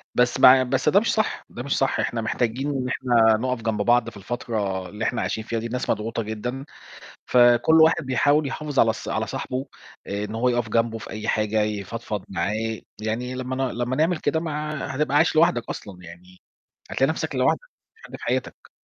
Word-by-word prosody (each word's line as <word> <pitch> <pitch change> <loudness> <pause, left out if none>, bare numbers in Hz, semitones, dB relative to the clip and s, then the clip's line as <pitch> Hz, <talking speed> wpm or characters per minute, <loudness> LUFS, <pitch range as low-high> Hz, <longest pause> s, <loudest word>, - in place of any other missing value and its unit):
بس 125 0 +2
مع 130 0 +8
بس 130 +3 +1
ده 200 - +5
مش 230 - 0
صح 215 -1 -1
ده 120 - -7
مش 140 - -1
صح، 135 - +1
إحنا 115 -1 -1
محتاجين 120 +5 -1
إن 130 -2 -2
إحنا 115 -4 +3
نقَف 125 0 -2
جنب 110 -2 -1
بعض 120 +1 +3
في 105 - -14
الفترة 100 -4 -3
اللي 105 +2 -4
إحنا - - -1
عايشين 110 - -2
فيها 115 +1 -3
دي 115 - -6
الناس 125 +2 -4
مضغوطة 115 +1 -1
جدًا، 125 +5 -5 0.6
فكل 120 +6 +5
واحد 160 -4 +4
بيحاول 145 +3 +2
يحافظ 145 0 -4
على 110 -1 +5
ص - - -8
على - - -1
صاحبه 130 +2 -4 0.4
آآ 100 +1 -3
إن 105 +1 -6
هو 125 +3 +1
يقَف 120 -2 0
جنبه 115 +1 0
في - - -9
أي 110 0 -6
حاجة، 110 0 +1
يفضفض 105 0 -4
معاه 95 +1 -2
ي 110 0 -3 0.2
يعني 120 +4 -3
لمّا 130 0 -4
ن - - -3
لمّا 125 +2 -2
نعمل 160 +2 +2
كده 155 +2 0
ما 160 -2 -4 0.2
ع 150 -2 -4
هتبقى 140 +1 -1
عايش 160 +1 +3
لوحدك 155 -7 +3
أصلًا 95 -3 -8
يعني 90 +2 -14 0.5
هتلاقي 135 +3 +2
نَفْسك 160 -2 -3
لوحدك، 130 0 +2
ما - - -29
فيش 450 - -21
حد - - -9
في - - -10
حياتك. - - -3
120 Hz, 210 wpm, -24 LUFS, 110-135 Hz, 0.6 s, مع